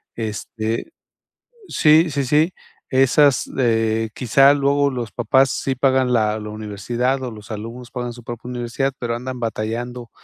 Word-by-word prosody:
este 110 - -4 0.8
sí, 155 +2 +4
sí, 140 -1 -1
sí, 150 +6 +2 0.4
esas, 135 +1 +4
eh, 115 -2 +1
quizá, 135 +3 +5
luego 140 0 +2
los 120 -4 -5
papás 130 +3 +3
sí 135 - -1
pagan 130 -1 +2
la 110 -2 +2
la 105 0 -6
universidad, 115 +5 -2
o 125 - -4
los 105 0 -12
alumnos 115 +3 -7
pagan 120 -1 -4
su 120 0 -12
propia 120 +1 -7
universidad, 125 +3 -2
pero 120 -1 -2
andan 125 0 -6
batallando 115 +2 -4
120 Hz, 145 wpm, -21 LUFS, 115-135 Hz, 0.8 s, quizá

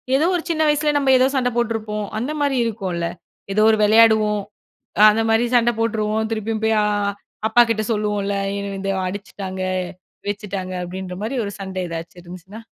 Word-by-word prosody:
ஏதோ 295 +4 +3
ஒரு 335 - -2
சின்ன 315 -1 0
வயசுல 295 0 +2
நம்ம 275 -2 +2
ஏதோ 255 +1 +4
சண்ட 250 -1 +2
போட்ருப்போம். 215 -3 -2
அந்த 255 +6 -2
மாரி 280 -2 +1
இருக்கும்ல. 190 -7 -2 0.5
ஏதோ 215 - +2
ஒரு 220 - +2
விளையாடுவோம். 215 -1 +5 0.6
அ - - +7
அந்தமாரி 225 +2 +2
சண்ட 240 0 +4
போட்டுருவோம், 220 -1 0
திருப்பியும் 220 0 -2
போய் 220 0 +3
அ - - +1 0.6
அப்பா 240 +2 +6
கிட்ட 215 -1 +1
சொல்லுவோம்ல. 205 -2 -1 0.2
"என்னை 200 0 -4
வந்து 195 0 -2
அடிச்சுட்டாங்க, 190 0 -6 0.7
வச்சுட்டாங்க." 200 -2 -4
அப்படின்ற 180 0 -6
மாரி 250 +5 -3
ஒரு 200 - -4
சண்ட 190 -1 -7
எதாச்சும் 165 +1 -7
இருந்துச்சுனா 185 +5 -11
215 Hz, 160 wpm, -21 LUFS, 195-230 Hz, 0.7 s, அ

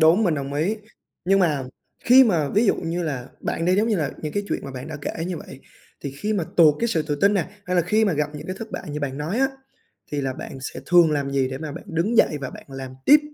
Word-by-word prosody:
đúng, 165 +7 +6
mình 170 - +2
đồng 140 -1 -4
ý. 170 +9 0 0.5
Nhưng 195 +2 +4
mà 150 -8 +2 0.4
khi 255 +2 +8
mà 165 -10 +2
ví 215 +9 +2
dụ - - +4
như 170 +2 -2
là, 135 -6 -3
bạn 165 - -2
đi, 180 +2 +3
giống 215 +3 +2
như 215 - +2
là, 150 -5 -1
những 150 -1 -3
cái 205 - -1
chuyện - - -1
mà 135 - -6
bạn 130 +1 -7
đã 155 - -5
kể 165 +3 -4
như 180 -2 -3
vậy 135 -3 -10 0.4
thì 140 - -4
khi 210 +10 -2
mà 195 -6 0
tụt 155 -4 +7
cái 235 - +1
sự 185 -9 +1
tự 150 -1 -2
tin 200 +1 +5
nè, 180 -4 0 0.2
hay 180 0 -1
là 175 - +4
khi 215 +6 +2
mà 200 - +2
gặp 150 -1 0
những 150 - -7
cái 185 - -4
thất 225 0 -7
bại - - -5
như 150 +1 -4
bạn 140 -1 -3
nói 160 +10 -2
á, 270 0 +3 0.6
thì 145 - 0
là 135 -1 -1
bạn 135 - -8
sẽ 135 - -6
thường 175 -2 +6
làm 140 -2 -1
gì 135 -1 +1
để 130 0 -5
mà 155 -1 -5
bạn 165 - -8
đứng 175 +8 0
dậy 150 - +4
và 135 - -4
bạn - - -11
làm 135 -1 -7
tiếp? 295 +1 +8
160 Hz, 290 wpm, -23 LUFS, 145-195 Hz, 0.6 s, khi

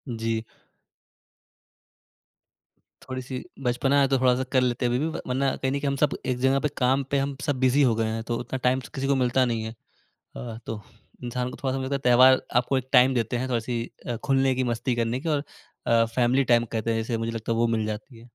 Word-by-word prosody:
जी। 115 0 -2 2.6
थोड़ी-सी 130 0 -6 0.2
बचपना 135 +3 +2
है, 135 - +4
तो 135 0 +2
थोड़ा-सा 130 0 +3
कर 130 -2 +4
लेते 125 0 0
हैं 120 - +1
अभी 125 - +1
भी 155 - 0
व - - -5
वरना 135 +1 0
कहीं 130 0 -2
न 140 - -1
कहीं 140 - -2
हम 140 - -1
सब 150 - +1
एक 130 -1 0
जगह 135 +1 +3
पे 150 - 0 0.2
काम 135 +2 +3
पे 140 - +2
हम 140 0 -2
सब 140 -4 -1
बिज़ी 130 +2 +3
हो 115 - +1
गए 115 0 0
हैं 115 - -4
तो 120 0 -2
उतना 130 - -4
टाइम 130 +1 +3
स - - -10
तो - - -11
किसी 135 0 -2
को 140 - +3
मिलता 130 0 +2
नहीं 115 -2 -1
है। 110 - -5 0.4
अ, 115 -2 -9
तो 110 -2 -4 0.4
इंसान 125 +1 -2
को - - -9
थोड़ा-सा 135 0 -1
मुझे 130 - -3
लगता - - +2
है 120 - +6
त्योहार 130 +1 +7 0.2
आपको 130 +2 +2
एक 130 0 -7
टाइम 130 +1 +6
देते 120 0 0
हैं 130 +2 -2
थोड़ी-सी 120 -1 -1 0.2
अ, 120 -2 -2
खुलने 135 -1 +2
की, 130 0 0
मस्ती 120 +2 -1
करने 115 +2 -1
की 165 - -4
और 145 -2 +1 0.4
अ, 115 0 +4
फैमिली 130 +2 +3
टाइम 120 0 +4
कहते 115 0 -1
हैं - - 0
जिसे 115 0 -2
मुझे 115 0 -2
लगता 115 0 -3
है - - 0
वो 120 - +3
मिल 110 -1 -1
जाती 110 +3 -6
है। 115 - -15
125 Hz, 240 wpm, -25 LUFS, 115-135 Hz, 2.6 s, त्योहार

